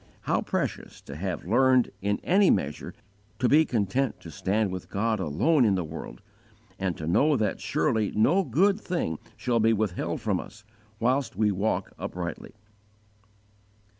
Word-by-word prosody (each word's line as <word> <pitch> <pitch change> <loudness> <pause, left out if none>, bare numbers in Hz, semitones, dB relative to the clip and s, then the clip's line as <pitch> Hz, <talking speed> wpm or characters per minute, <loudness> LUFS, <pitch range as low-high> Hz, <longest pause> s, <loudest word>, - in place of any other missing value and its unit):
_ - - -28 0.2
How - - 0
precious - - -3
to 70 - -10
have 90 +2 -4
learned, 130 +5 +3
in 100 +1 0
any 195 +1 +4
measure, 75 -6 -1 0.4
to 125 - +2
be 155 +5 +5
content 120 +3 -1
to 80 - -10
stand 100 +6 0
with 95 -1 -6
God 110 +2 0
alone 105 - +2
in 105 -4 +3
the 90 - -1
world, 80 -6 -8 0.6
and 95 -3 -2
to 80 - -5
know 140 - +3
that 105 -4 -1
surely 120 -8 0
no 165 - +3
good 190 - +2
thing 125 - -2 0.2
shall 120 -2 0
be 115 +1 +4
withheld 105 -4 -2
from - - 0
us, 105 +1 -11 0.4
whilst 130 +1 0
we 105 +1 +2
walk 100 +3 -1
uprightly!" 85 -2 -6
110 Hz, 160 wpm, -27 LUFS, 95-130 Hz, 0.6 s, be